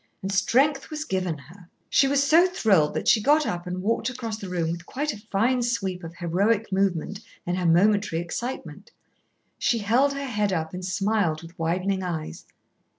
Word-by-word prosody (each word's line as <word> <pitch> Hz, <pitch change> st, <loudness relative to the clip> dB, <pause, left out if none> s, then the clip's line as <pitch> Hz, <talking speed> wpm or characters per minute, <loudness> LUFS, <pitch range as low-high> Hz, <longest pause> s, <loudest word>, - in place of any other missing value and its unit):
And 195 Hz, -, -2 dB
strength 270 Hz, +8 st, +2 dB
was 310 Hz, 0 st, -4 dB
given 185 Hz, -, -2 dB
her." 170 Hz, +6 st, -16 dB, 0.2 s
She 275 Hz, -, +4 dB
was 280 Hz, 0 st, +2 dB
so 325 Hz, +6 st, +5 dB
thrilled 195 Hz, -, +2 dB
that -, -, -2 dB
she 220 Hz, -, +5 dB
got 295 Hz, +6 st, +4 dB
up 175 Hz, 0 st, -3 dB
and 180 Hz, +1 st, -4 dB
walked 230 Hz, +4 st, 0 dB
across 230 Hz, -3 st, -5 dB
the 195 Hz, -, -7 dB
room 170 Hz, -2 st, -1 dB
with 170 Hz, +1 st, -7 dB
quite 295 Hz, +2 st, -2 dB
a -, -, -10 dB
fine 225 Hz, +4 st, 0 dB
sweep 195 Hz, -7 st, -2 dB
of 165 Hz, 0 st, -8 dB
heroic 200 Hz, +6 st, 0 dB
movement 190 Hz, 0 st, 0 dB, 0.3 s
in 175 Hz, -, -1 dB
her 180 Hz, -1 st, 0 dB
momentary 200 Hz, +1 st, +3 dB
excitement. 235 Hz, +9 st, -6 dB, 0.7 s
She 240 Hz, -, +2 dB
held 240 Hz, +7 st, +2 dB
her 280 Hz, 0 st, -4 dB
head 210 Hz, -6 st, 0 dB
up 160 Hz, -2 st, -2 dB
and 180 Hz, 0 st, -6 dB
smiled 190 Hz, -3 st, 0 dB
with 165 Hz, +1 st, -13 dB
widening 185 Hz, +4 st, 0 dB
eyes. 160 Hz, -, -5 dB
195 Hz, 185 wpm, -25 LUFS, 175-240 Hz, 0.7 s, so